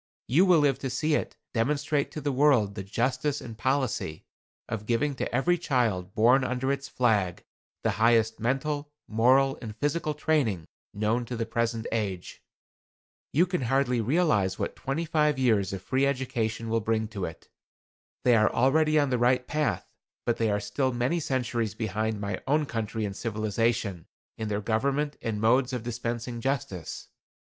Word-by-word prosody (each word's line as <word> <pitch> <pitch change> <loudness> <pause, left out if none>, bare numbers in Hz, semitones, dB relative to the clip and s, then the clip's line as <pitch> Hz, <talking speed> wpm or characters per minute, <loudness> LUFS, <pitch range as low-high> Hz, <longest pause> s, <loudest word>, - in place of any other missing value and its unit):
You 165 - +4
will 180 -2 +6
live 140 -3 +2
to 135 - -3
see 150 +5 0
it - - -1 0.2
demonstrate 145 +4 0
to 155 - -5
the 145 0 0
world 130 -7 +3
the 100 - -5
justice 130 +8 -1
and 115 -2 -8
policy 130 - -1 0.4
of 105 -2 -5
giving 135 +5 +1
to - - -2
every 170 +8 +2
child 110 - 0
born 120 +5 +5
under 130 +1 -1
its 140 0 -3
flag 105 -8 +1 0.4
the - - +2
highest 115 -1 +3
mental, 145 +5 -1 0.2
moral 130 +5 +3
and 110 -4 -7
physical 150 +4 -1
training 135 - 0 0.3
known 110 +4 0
to 120 0 -5
the 115 - -1
present 115 0 -1
age. 100 -6 -3 0.9
You 170 +6 +4
can 180 -3 -2
hardly 125 -1 +1
realize 110 - +2
what - - -3
twenty 140 +5 -3
five 150 -3 +2
years 110 -7 +2
of 95 -1 -5
free 135 +1 +1
education 120 -5 -2
will 115 0 +1
bring 110 0 0
to 100 -5 -4
it. 80 - -9 0.8
They 125 -1 +5
are 110 -1 +4
already 155 +5 +3
on 145 -3 +2
the 125 - +1
right 125 +1 +3
path, 150 +2 -2 0.3
but 120 - +1
they 115 -1 +1
are 105 0 +1
still 130 +6 -1
many 125 +7 0
centuries 120 -6 -1
behind 110 -1 -2
my 100 0 -3
own 150 +2 +2
country 110 -3 -3
in 100 - -4
civilization, 110 -3 -1 0.3
in 110 - -4
their 105 0 -1
government 140 +7 0
and 110 -3 -2
modes 125 +4 +3
of 125 -3 -3
dispensing 120 0 -4
justice. 115 - -3
120 Hz, 170 wpm, -27 LUFS, 110-140 Hz, 0.9 s, will